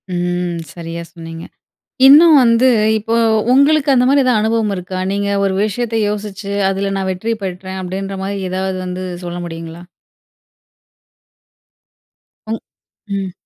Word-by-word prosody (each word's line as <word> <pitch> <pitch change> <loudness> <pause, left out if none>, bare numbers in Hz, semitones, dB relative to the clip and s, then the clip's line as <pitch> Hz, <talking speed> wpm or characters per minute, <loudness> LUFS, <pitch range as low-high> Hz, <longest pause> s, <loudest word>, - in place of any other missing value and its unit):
ம். 175 -1 -2
சரியா 170 -1 -6
சொன்னீங்க. 165 -1 -9 0.6
இன்னும் 305 +2 +8
வந்து 235 +2 +4 0.3
இப்போ 225 +2 -2 0.4
உங்களுக்கு 285 +2 +4
அந்தமாரி 265 +2 +4
எதா 250 -1 +2
அனுபவம் 220 -2 0
இருக்கா? 185 0 -5
நீங்க 200 0 -1 0.2
ஒரு 195 -1 +1
விஷயத்த 225 +2 -3
யோசிச்சு 205 -1 -5 0.2
அதில 195 +1 -2
நான் 190 -1 -2
வெற்றி 225 +5 -2
பெற்றேன் 190 0 -5
அப்பிடின்றமாரி 195 +1 -4
ஏதாவது 190 0 -2
வந்து 180 +1 -5 0.2
சொல்ல 175 0 -5
முடியுங்களா? 165 +1 -8 2.7
உங் 225 - -2 0.6
ம். 190 -2 -4
195 Hz, 115 wpm, -17 LUFS, 180-225 Hz, 2.7 s, இன்னும்